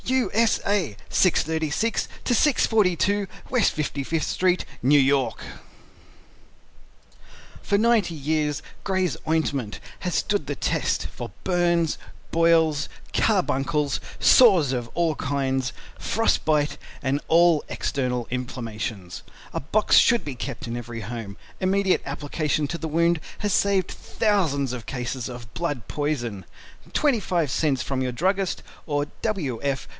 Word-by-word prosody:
U. 260 Hz, 0 st, +1 dB
S. 225 Hz, +1 st, +3 dB
A. 185 Hz, -, 0 dB
636 160 Hz, +4 st, +1 dB, 0.2 s
to 245 Hz, -, +2 dB
642 205 Hz, -, +2 dB, 0.2 s
West 245 Hz, -5 st, +2 dB
55th 150 Hz, +1 st, -1 dB
Street, 185 Hz, -1 st, +1 dB, 0.2 s
New 145 Hz, +3 st, +6 dB
York 135 Hz, -1 st, +2 dB, 2.2 s
For 200 Hz, -, +1 dB
90 215 Hz, -6 st, +2 dB
Years 150 Hz, 0 st, -1 dB, 0.2 s
GRAY'S 190 Hz, -2 st, 0 dB
OINTMENT 140 Hz, -8 st, -1 dB, 0.2 s
Has 180 Hz, -2 st, -2 dB
stood 205 Hz, -9 st, 0 dB
the 145 Hz, -, -2 dB
test -, -, 0 dB
for -, -, -8 dB
Burns, 175 Hz, -3 st, +2 dB, 0.3 s
Boils, 165 Hz, -3 st, +3 dB, 0.2 s
Carbuncles, 145 Hz, +1 st, +1 dB, 0.2 s
Sores 185 Hz, -, +6 dB
of 120 Hz, -2 st, -3 dB
All 170 Hz, -3 st, +1 dB
Kind, 135 Hz, -2 st, -1 dB, 0.3 s
Frost 225 Hz, +2 st, +1 dB
Bite 150 Hz, -2 st, +1 dB, 0.3 s
and 140 Hz, +1 st, 0 dB
all 170 Hz, -2 st, +5 dB
External 125 Hz, -3 st, -2 dB
Inflammations. 115 Hz, -6 st, -5 dB, 0.3 s
A -, -, -1 dB
box 205 Hz, +10 st, +3 dB
should 235 Hz, 0 st, +5 dB
be 145 Hz, -3 st, -5 dB
kept 125 Hz, 0 st, -5 dB
in 115 Hz, -, -3 dB
every 120 Hz, -1 st, -6 dB
home. 110 Hz, -2 st, -6 dB, 0.2 s
Immediate 190 Hz, 0 st, +2 dB
application 145 Hz, +1 st, -1 dB
to 170 Hz, -, -4 dB
the 160 Hz, -, -4 dB
wound 170 Hz, +1 st, +2 dB, 0.2 s
has 205 Hz, -2 st, 0 dB
saved 195 Hz, -2 st, +2 dB
thousands 155 Hz, -, 0 dB
of 120 Hz, -3 st, -6 dB
cases 125 Hz, 0 st, -4 dB
of 120 Hz, -3 st, -9 dB
Blood 145 Hz, -6 st, -3 dB
Poison. 120 Hz, -10 st, -2 dB, 0.5 s
25 195 Hz, -, +1 dB
cents 135 Hz, 0 st, +1 dB
from 135 Hz, -1 st, -2 dB
your 130 Hz, -1 st, -1 dB
Druggist 190 Hz, +6 st, 0 dB, 0.3 s
or 145 Hz, -2 st, 0 dB, 0.2 s
W. 160 Hz, -, -2 dB
F. 140 Hz, -2 st, -2 dB
150 Hz, 125 wpm, -24 LUFS, 130-185 Hz, 2.2 s, New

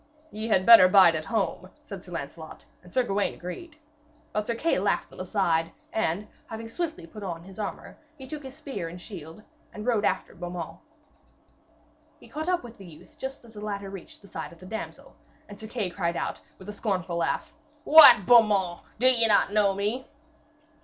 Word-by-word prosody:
'Ye 215 Hz, +1 st, -5 dB
had 190 Hz, -4 st, +2 dB
better 230 Hz, -6 st, +10 dB
bide 185 Hz, -2 st, +7 dB
at 155 Hz, 0 st, -3 dB
home,' 190 Hz, -1 st, -2 dB
said 195 Hz, -2 st, -9 dB
Sir 180 Hz, -, -13 dB
Lancelot, 160 Hz, 0 st, -8 dB, 0.2 s
and 180 Hz, -, -17 dB
Sir 255 Hz, -, +2 dB
Gawaine 200 Hz, -3 st, -1 dB
agreed. 295 Hz, -, -8 dB, 0.6 s
But 210 Hz, 0 st, -2 dB
Sir 235 Hz, -, -1 dB
Kay 325 Hz, +8 st, 0 dB
laughed -, -, -1 dB
them -, -, -14 dB
aside, 165 Hz, -5 st, 0 dB, 0.2 s
and 205 Hz, -1 st, -1 dB, 0.2 s
having 225 Hz, 0 st, -7 dB
swiftly 320 Hz, -, -4 dB
put 210 Hz, +6 st, -11 dB
on 170 Hz, -4 st, -5 dB
his 195 Hz, +3 st, -13 dB
armour, 205 Hz, -, -6 dB, 0.2 s
he 265 Hz, -, -10 dB
took 295 Hz, +3 st, -7 dB
his 265 Hz, -1 st, -10 dB
spear 270 Hz, -, -6 dB
and 175 Hz, +2 st, -10 dB
shield 175 Hz, -1 st, -10 dB, 0.3 s
and 210 Hz, 0 st, -8 dB
rode 230 Hz, -4 st, +1 dB
after -, -, -1 dB
Beaumains. 175 Hz, -1 st, -7 dB, 1.4 s
He -, -, -16 dB
caught 315 Hz, +3 st, -4 dB
up 360 Hz, -5 st, 0 dB
with 235 Hz, -3 st, -12 dB
the 195 Hz, -, -11 dB
youth 160 Hz, -3 st, -16 dB
just 265 Hz, -2 st, -7 dB
as 225 Hz, -, -16 dB
the 210 Hz, -, -9 dB
latter 200 Hz, -2 st, -5 dB
reached 195 Hz, +1 st, -11 dB
the -, -, -14 dB
side -, -, -7 dB
of 170 Hz, -, -15 dB
the 185 Hz, -, -14 dB
damsel, 220 Hz, +4 st, -8 dB, 0.3 s
and 205 Hz, -1 st, -12 dB
Sir 220 Hz, -, -8 dB
Kay 210 Hz, -6 st, -3 dB
cried 170 Hz, -2 st, -2 dB
out, -, -, -4 dB, 0.2 s
with 190 Hz, -, -14 dB
a 210 Hz, -, -6 dB
scornful 185 Hz, -5 st, -2 dB
laugh: 170 Hz, -, -2 dB, 0.3 s
'What! 290 Hz, -, +9 dB
Beaumains, 205 Hz, -6 st, +4 dB, 0.2 s
do 245 Hz, -, 0 dB
ye 240 Hz, -3 st, +6 dB
not 205 Hz, -1 st, +3 dB
know 205 Hz, -2 st, +3 dB
me?' 210 Hz, +6 st, -2 dB
205 Hz, 195 wpm, -26 LUFS, 180-230 Hz, 1.4 s, better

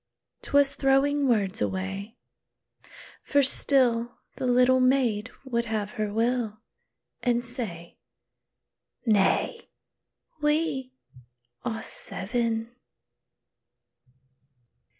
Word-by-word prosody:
'T -, -, -11 dB
was 285 Hz, -1 st, +5 dB
throwing 275 Hz, +1 st, +2 dB
words 215 Hz, -2 st, +1 dB
away; 195 Hz, +4 st, -3 dB, 1.0 s
for 285 Hz, 0 st, +2 dB
still 245 Hz, -3 st, +3 dB, 0.2 s
The 255 Hz, -, -2 dB
little 250 Hz, +1 st, +4 dB
maid 250 Hz, -4 st, +2 dB, 0.2 s
would 235 Hz, -2 st, -1 dB
have 215 Hz, -2 st, -3 dB
her 215 Hz, -4 st, -3 dB
will, 225 Hz, 0 st, 0 dB, 0.6 s
And 240 Hz, -1 st, 0 dB
say, 210 Hz, -9 st, -3 dB, 1.1 s
"Nay, 220 Hz, -, +1 dB, 0.7 s
we 295 Hz, -4 st, 0 dB, 0.7 s
are 225 Hz, -2 st, -3 dB
seven!" 230 Hz, +3 st, -2 dB
240 Hz, 80 wpm, -26 LUFS, 215-265 Hz, 1.1 s, was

